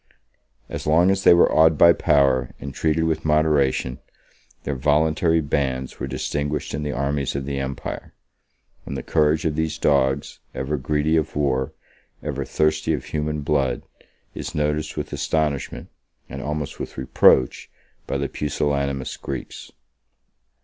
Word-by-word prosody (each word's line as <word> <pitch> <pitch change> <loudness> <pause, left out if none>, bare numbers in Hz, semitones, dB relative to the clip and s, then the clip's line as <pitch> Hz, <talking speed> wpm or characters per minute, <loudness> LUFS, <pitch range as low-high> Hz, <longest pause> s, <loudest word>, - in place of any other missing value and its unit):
As - - -6
long 85 +5 +5
as 95 0 0
they - - +8
were 85 - +5
awed 80 0 +5
by 85 +2 +7
power 65 -5 +2
and 70 -1 -7
treated 80 +2 +1
with 80 -1 0
moderation, 75 -4 +1 0.6
their - - -2
voluntary 80 +4 +2
bands 65 -3 -2
were - - -3
distinguished 75 +1 -3
in 70 - -2
the 75 0 -2
armies 70 0 -1
of 70 -1 -3
the 70 -1 -3
empire; 70 0 -5 0.7
and 70 - -5
the 65 - -5
courage 75 0 +2
of 75 -2 0
these 80 0 -1
dogs, 70 -3 +1 0.2
ever 65 +3 -2
greedy 75 +3 +1
of 80 - -2
war, 65 -3 0 0.5
ever 70 -2 -3
thirsty 80 +3 +1
of 75 - -3
human 75 0 -2
blood, 70 -4 0 0.5
is - - -6
noticed 75 0 -1
with - - -4
astonishment, 75 0 -1 0.4
and 70 - -7
almost 75 0 -4
with - - -6
reproach, 65 -1 +3 0.4
by - - -1
the - - -1
pusillanimous 70 -2 -2
Greeks. 65 -3 -7
75 Hz, 145 wpm, -23 LUFS, 70-80 Hz, 0.7 s, they